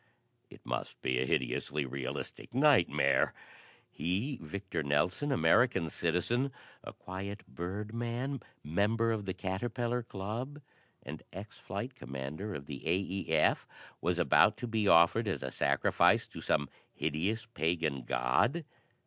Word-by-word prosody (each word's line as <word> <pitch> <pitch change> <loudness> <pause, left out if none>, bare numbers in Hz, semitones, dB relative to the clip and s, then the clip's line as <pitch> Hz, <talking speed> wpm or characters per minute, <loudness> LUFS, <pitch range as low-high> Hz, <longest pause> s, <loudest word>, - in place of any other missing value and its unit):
It - - -15
must - - -3
be 65 -1 +1
a 65 - 0
hideously 70 +4 0
realistic 65 - -5
nightmare! 85 - +4 0.5
He, 105 - -2
Victor 95 +5 -4
Nelson, 85 - +1
American 120 -9 +4
citizen, 115 +11 0 0.3
a - - -7
quiet 100 +3 -7
birdman, 115 +8 -3 0.2
member 105 +9 +2
of 110 -2 -2
the 95 - -2
Caterpillar 120 +6 -1
Club 115 +7 -5 0.4
and - - -7
ex - - -9
flight - - -5
commander 75 +10 -5
of 70 - -6
the 70 -2 -7
A. 85 - +4
E. 95 0 -3
F. 80 -1 +3 0.3
was - - +1
about - - +5
to - - -4
be 110 -3 0
offered 85 +7 +6
as 95 - -1
a 65 - -3
sacrifice 70 +1 +3
to - - -10
some 70 - +1 0.3
hideous, 95 +9 -1
pagan 80 - 0
god? 65 - +1
95 Hz, 130 wpm, -32 LUFS, 75-115 Hz, 0.5 s, offered